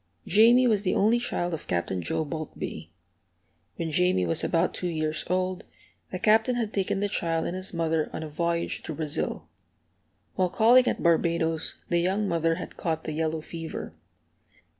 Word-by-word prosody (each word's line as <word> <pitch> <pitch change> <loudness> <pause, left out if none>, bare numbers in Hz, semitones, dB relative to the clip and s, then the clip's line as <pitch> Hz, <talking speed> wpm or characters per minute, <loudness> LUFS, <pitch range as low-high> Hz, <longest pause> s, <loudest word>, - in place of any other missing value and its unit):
Jamie 235 +6 +5
was 215 -5 +3
the 185 - 0
only 220 +4 +3
child 175 -7 -2
of 160 - -6
Captain 90 +1 -1
Joe 90 - -2
Boultbee. 145 - -6 0.9
When 165 -1 -3
Jamie 180 - +2
was 85 -1 +5
about 170 +2 +1
two 180 - -3
years 155 -2 -2
old, 185 0 -1 0.5
the 185 - -3
Captain 220 +5 +3
had 225 -3 -2
taken 195 0 -1
the 205 - +1
child 165 -4 -1
and 175 - -3
his 185 +1 -4
mother 165 -2 0
on - - -5
a - - -5
voyage 170 +2 -2
to 160 - -6
Brazil. 155 -2 -2 0.9
While 185 -1 +1
calling 235 +7 +5
at - - -1
Barbadoes 165 -1 +1
the 175 - +2
young 190 +4 0
mother 165 -1 +1
had 180 - -8
caught 160 -1 -2
the 155 - -4
yellow 160 0 -1
fever. 165 0 -7
170 Hz, 170 wpm, -26 LUFS, 160-195 Hz, 0.9 s, Jamie